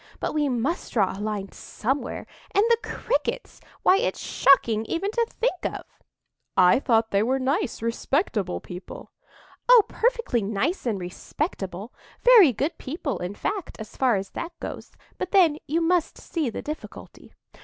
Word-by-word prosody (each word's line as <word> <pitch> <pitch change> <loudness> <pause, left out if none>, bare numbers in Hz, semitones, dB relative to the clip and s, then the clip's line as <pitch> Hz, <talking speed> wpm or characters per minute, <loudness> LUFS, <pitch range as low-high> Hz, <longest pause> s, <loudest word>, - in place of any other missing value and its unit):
But - - -2
we 300 -2 +1
must 260 +8 -2
draw 200 -6 +2
a 200 - -7
line 210 -2 -3
somewhere,—and 270 - -3
the 465 - +5
Crickets! - - -3 0.2
why, 380 - +6
it's 485 - -1
shocking 230 -5 +3
even 370 - -2
to 465 +1 +1
think 460 -6 -2
of!" - - -3 0.7
"I 180 +5 +6
thought 225 -4 +2
they 200 - +3
were 255 +5 +1
nice, 275 - -1
respectable 230 - -1
people." 180 +1 -10 0.6
"Oh, - - +9
perfectly 470 - 0
nice 225 - -1
and 220 -4 0
respectable,—very 240 - +1
good 285 +8 -2
people, 280 0 -4
in 180 +3 -4
fact, 395 - -4
so 220 -1 -9
far 255 -4 +4
as 195 0 -4
that 340 +1 -5
goes. - - -7 0.3
But 365 - -2
then 335 -7 +4
you 325 +4 +1
must 345 0 +1
see 315 -7 -2
the - - -6
difficulty." 305 +1 -9
270 Hz, 150 wpm, -25 LUFS, 215-355 Hz, 0.7 s, Oh